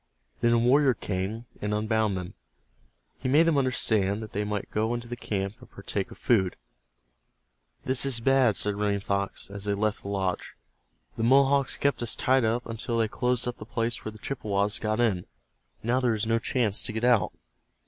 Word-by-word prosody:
Then 120 - +3
a 120 - +4
warrior 130 +2 +4
came, 100 +4 -4 0.2
and 105 0 -1
unbound 110 -2 0
them. 90 -1 -6 0.9
He 130 - -2
made 150 +5 +6
them 165 -2 +2
understand 110 -5 +1
that 110 - -10
they 105 - -1
might 105 -1 -4
go 110 +3 0
into 120 0 -6
the 120 - -5
camp, 100 -3 -3
and - - -15
partake - - -3
of - - -12
food. 95 -6 +2 1.3
"This 130 0 +5
is 135 -4 0
bad," 130 -3 +3
said 105 -1 -1
Running 105 -1 +1
Fox, 100 0 -3
as 100 0 -6
they 100 -1 0
left 105 +1 -1
the - - -9
lodge. 95 -3 -2 0.6
"The 115 - -1
Mohawks 135 +2 +4
kept 140 -2 0
us 120 - -1
tied 130 0 +2
up 115 +2 0
until 115 +1 -3
they 115 -1 +2
closed 125 +2 0
up 125 - -4
the - - -7
place 115 0 -2
where 110 - -4
the 110 - -13
Chippewas 105 -4 -1
got 110 +1 -1
in. 105 -7 +1 0.6
Now 120 +3 +2
there 120 -3 +1
is 110 +1 -1
no 115 +1 +2
chance 115 -4 0
to 115 - -2
get 110 +1 -3
out." 120 -3 +3
110 Hz, 195 wpm, -27 LUFS, 105-125 Hz, 1.3 s, made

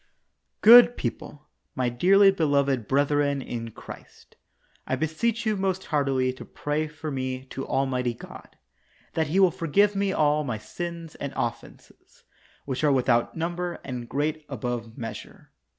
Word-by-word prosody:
Good 240 +2 +9
people 150 0 -6
— - - -50
my 125 -2 0
dearly 195 +10 +5
beloved 140 - +1
brethren 145 0 +1
in 115 -3 -5
Christ - - -13 0.3
— - - -37
I 130 - 0
beseech 185 - -1
you 215 -1 +1
most 190 -1 -2
heartily 135 -3 +1
to 130 - -10
pray 150 +1 -3
for 155 0 -7
me 130 -1 -4
to 135 - -5
Almighty 130 -3 0
God, - - -13 0.6
that 160 -1 0
He 175 +6 +1
will 190 -2 +5
forgive 200 +7 +2
me 200 0 0
all 150 -3 +2
my 125 -6 -3
sins 165 +8 -7
and 140 -1 -6
offenses, 120 0 -7 0.4
which 135 +1 -3
are 150 - +4
without 125 0 +1
number, 175 +1 -2
and 125 -3 -6
great 155 +2 -2
above 120 -3 -5
measure. 115 -3 -8
145 Hz, 150 wpm, -26 LUFS, 130-170 Hz, 0.6 s, Good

